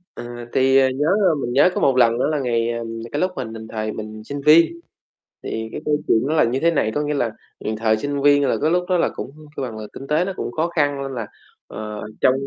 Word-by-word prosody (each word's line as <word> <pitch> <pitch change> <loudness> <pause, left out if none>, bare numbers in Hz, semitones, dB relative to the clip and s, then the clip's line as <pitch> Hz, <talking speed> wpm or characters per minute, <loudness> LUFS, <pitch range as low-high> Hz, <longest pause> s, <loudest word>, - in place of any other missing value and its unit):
Ừ, - - -7 0.3
thì, 135 0 +4
ờ, 130 -1 +5
nhớ, 145 +4 -1 0.3
mình 120 - -3
nhớ 145 +7 +5
có - - -1
một 135 -2 +3
lần 115 -1 +4
đó - - +2
là 150 -2 0
ngày 120 -2 0
ờ, 115 0 -3 0.3
cái 145 - -2
lúc 185 0 +1
mà, - - -3 0.3
thời 110 -1 -3
mình 110 0 -7
sinh 140 +4 -6
viên, 165 - +6 0.6
thì 110 0 -4
cái - - -6
câu 150 -1 +2
chuyện 110 - +4
nó 155 - 0
là 155 - +5
như 125 +3 0
thế 170 +2 +3
này, 110 -8 +1
có 150 - +1
nghĩa 150 0 -1
là, 120 -6 0 0.3
ừm, 110 - -3
thời 110 0 +2
sinh 145 +3 -2
viên 145 0 +5
là - - +2
cái 155 - +3
lúc 180 0 +2
đó 180 - +3
là - - +2
cũng - - -7 0.2
là 130 -3 -3
là 110 -1 -7
kinh 135 - -9
tế 155 +4 +2
nó 195 - -3
cũng - - -4
khó 160 +7 0
khăn 145 -2 +2
nên 135 0 -4
là, 115 -3 -4 0.4
ờ, 105 -1 -6 0.2
trong 130 - +5
135 Hz, 260 wpm, -21 LUFS, 115-150 Hz, 0.6 s, viên